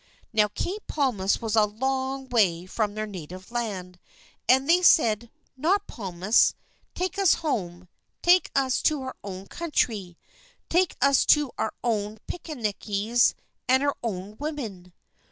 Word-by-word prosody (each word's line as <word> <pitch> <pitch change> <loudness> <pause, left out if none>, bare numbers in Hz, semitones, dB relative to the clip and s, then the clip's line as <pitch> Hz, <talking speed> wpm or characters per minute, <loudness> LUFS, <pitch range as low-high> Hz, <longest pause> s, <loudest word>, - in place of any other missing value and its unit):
Now, 210 -1 +4
Cape 380 - -5
Palmas 230 -10 0
was 225 -1 -1
a 215 -1 +5
long 265 +4 -2
way 185 -8 +2
from 205 +2 -2
their 215 0 -2
native 185 0 -9
land, 190 -7 -4 0.5
and 265 +2 +5
they 350 +2 +5
said, 235 - +4 0.3
"Not 375 +9 +1
Palmas. 190 +1 +1 0.4
Take 370 +2 -2
us 390 -4 +5
home, 180 - -2 0.4
take 355 +1 +5
us 265 -2 +2
to 300 -4 +1
our 260 - -6
own 190 -1 -7
country, 215 - -2 0.5
take 360 0 +2
us 275 -2 +5
to 295 -4 +4
our 220 - 0
own 215 -2 -1
pickaninnies 225 - 0 0.3
and 260 +2 +4
our 285 0 +1
own 210 -2 -5
women." 230 - -5
230 Hz, 135 wpm, -26 LUFS, 200-280 Hz, 0.5 s, a